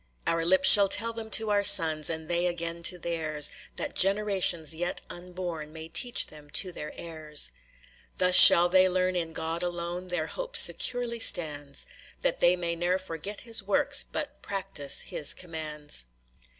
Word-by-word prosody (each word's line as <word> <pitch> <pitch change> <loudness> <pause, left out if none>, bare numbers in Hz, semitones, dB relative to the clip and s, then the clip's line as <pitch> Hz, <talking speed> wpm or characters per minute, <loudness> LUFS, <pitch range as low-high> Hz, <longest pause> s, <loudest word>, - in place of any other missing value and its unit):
"Our 165 0 -1
lips 185 +2 +3
shall 200 -1 +8
tell 230 +3 +1
them 225 -1 -8
to 220 0 +2
our 205 0 +1
sons, 160 -7 +4
And 160 -1 -6
they 175 +1 -1
again 170 -1 -6
to 180 +2 +1
theirs; 160 -4 -2 0.2
That - - -5
generations 195 -5 0
yet 175 +2 -4
unborn 175 -3 -8
May 160 0 -10
teach 245 +7 0
them 150 -1 -15
to 185 - -2
their 150 -3 -9
heirs. 155 - -2 0.7
"Thus 180 0 0
shall 175 -1 +10
they 185 +1 +3
learn 185 0 -1
in 165 -2 -4
God 160 +1 -5
alone 175 +1 -6
Their 175 -3 -3
hope - - -5
securely 240 -1 +1
stands;. 145 -8 0 0.4
That - - -1
they 175 - +3
may 170 -1 -4
ne'er 175 +2 -1
forget 185 +2 -8
his 230 -2 -1
works, 205 +8 0
But 295 -2 -7
practise 195 -8 -2
his 145 - 0
commands." 155 - -6
175 Hz, 165 wpm, -26 LUFS, 160-195 Hz, 0.7 s, shall